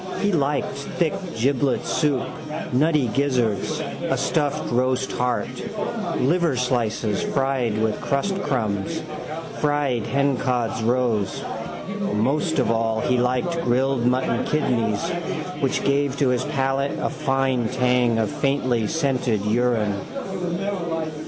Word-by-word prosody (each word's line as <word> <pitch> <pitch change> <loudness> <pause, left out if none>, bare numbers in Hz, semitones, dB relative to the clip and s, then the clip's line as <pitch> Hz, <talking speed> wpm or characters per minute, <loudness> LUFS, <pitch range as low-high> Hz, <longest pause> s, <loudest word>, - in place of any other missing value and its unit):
He 205 - +2
liked 145 -4 +1 0.2
thick 170 -3 +2 0.2
giblet 135 +2 +1
soup, 145 -6 +1 0.5
nutty 150 +1 +3
gizzards, 125 -5 +1
a - - -2
stuffed 145 -3 0
roast 130 +2 +1
heart, 125 -1 0 0.7
liverslices 125 - +1
fried 135 -5 +1
with 110 -1 0
crustcrumbs, 140 - -1 0.6
fried 145 -6 +1
hencods' 125 -5 0
roes. 120 -4 +1 0.7
Most 145 - +1
of 130 -4 +2
all 115 -1 +1
he 125 0 +2
liked 130 +8 +1
grilled 130 -1 +1
mutton 125 -2 +1
kidneys 125 -4 +1 0.5
which 135 -2 0
gave 140 0 +1
to 140 -3 +3
his 125 -1 +1
palate 135 +1 0
a - - -1
fine 135 -5 +1
tang 125 -1 +2
of 110 -2 +1
faintly 130 -5 +1
scented 130 -9 0
urine. 110 -1 +2
130 Hz, 105 wpm, -23 LUFS, 120-140 Hz, 0.7 s, nutty